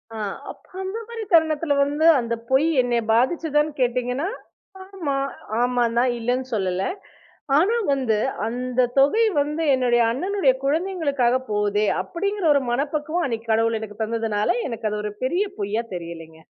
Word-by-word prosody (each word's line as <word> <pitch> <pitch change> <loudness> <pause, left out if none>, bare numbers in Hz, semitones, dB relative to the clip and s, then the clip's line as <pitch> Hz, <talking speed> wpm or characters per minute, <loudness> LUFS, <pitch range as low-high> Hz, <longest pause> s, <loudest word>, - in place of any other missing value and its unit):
ஆ. - - -5 0.3
அப்ப - - -18 0.2
அந்த 380 +3 -4
மாரி 465 -1 -6
தருணத்துல 315 -2 +3
வந்து, 290 +3 0
"அந்த 235 -1 -2 0.2
பொய் 265 +4 +3
என்ன 245 -1 0
பாதிச்சதான்னு 295 +4 +1
கேட்டீங்கன்னா" 250 +5 0 0.6
ஆமா, 365 -8 -3 0.5
ஆமான்தான் 245 0 +2
இல்லன்னு 250 +3 -1
சொல்லல. 185 -2 -1 0.7
ஆனா 385 +9 +3 0.2
வந்து, 255 -6 +1 0.3
அந்த 250 +1 0
தொகை 430 +12 +4 0.2
வந்து 300 +3 -2
என்னுடைய 245 -2 +3
அண்ணனுடைய 335 - +1
குழந்தைங்களுக்காக 285 -5 +1 0.2
போகுதே, 210 0 +1 0.2
அப்டிங்கற 400 0 -2
ஒரு 280 - +2
மனப்பக்குவம் 300 +6 -1
அன்னைக்கி 230 -2 -4
கடவுள் 225 0 +2
எனக்கு 210 0 -8
தந்ததுனால, 220 -2 -1 0.2
எனக்கு 230 -2 -3
அது 210 - -2
ஒரு 210 - -3
பெரிய 350 +9 +1 0.2
பொய்யா 210 +3 -1
தெரியலைங்க. 165 -2 -8
255 Hz, 135 wpm, -23 LUFS, 230-315 Hz, 0.7 s, தொகை